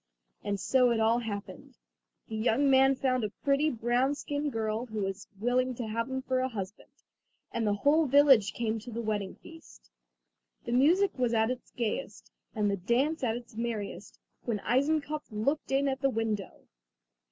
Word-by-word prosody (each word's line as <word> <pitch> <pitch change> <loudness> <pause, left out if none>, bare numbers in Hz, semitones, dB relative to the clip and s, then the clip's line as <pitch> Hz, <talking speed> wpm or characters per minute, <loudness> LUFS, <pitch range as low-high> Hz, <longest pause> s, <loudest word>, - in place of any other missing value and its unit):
And 200 -1 -2
so 250 +6 +3
it 235 -1 +1
all 225 +2 +3
happened. 210 -3 -7 0.5
The 220 - -6
young 245 +5 +2
man 270 0 +5
found 255 -2 0
a 210 - -1
pretty, 280 +7 +1
brown 245 +3 +1
skinned 290 0 -3
girl 220 +1 -2
who 215 -2 -4
was 195 +1 -4
willing 250 +3 +1
to 235 - -4
have 230 +3 -2
him 265 0 -3
for 260 0 0
a 260 - +1
husband, 200 -3 -7 0.6
and 225 -2 -1
the 205 - +2
whole 295 +8 +3
village 270 -7 +5
came 225 -1 -2
to 225 - -10
the 235 0 -5
wedding 205 -3 -2
feast. 325 -1 -16 0.7
The 235 - -4
music 325 +8 +3
was 240 -2 +1
at 220 +2 +2
its 255 -1 -6
gayest, 230 -3 -4 0.2
and 210 -2 +1
the 200 - -1
dance 250 - 0
at 230 -2 +1
its 240 -1 -12
merriest, 225 -3 -5 0.3
when 230 -3 -1
Eisenkopf 295 +2 0
looked 245 +10 -1
in 275 +1 +2
at 265 -1 -2
the 275 - +3
window. 220 -5 -3
240 Hz, 175 wpm, -29 LUFS, 220-270 Hz, 0.7 s, man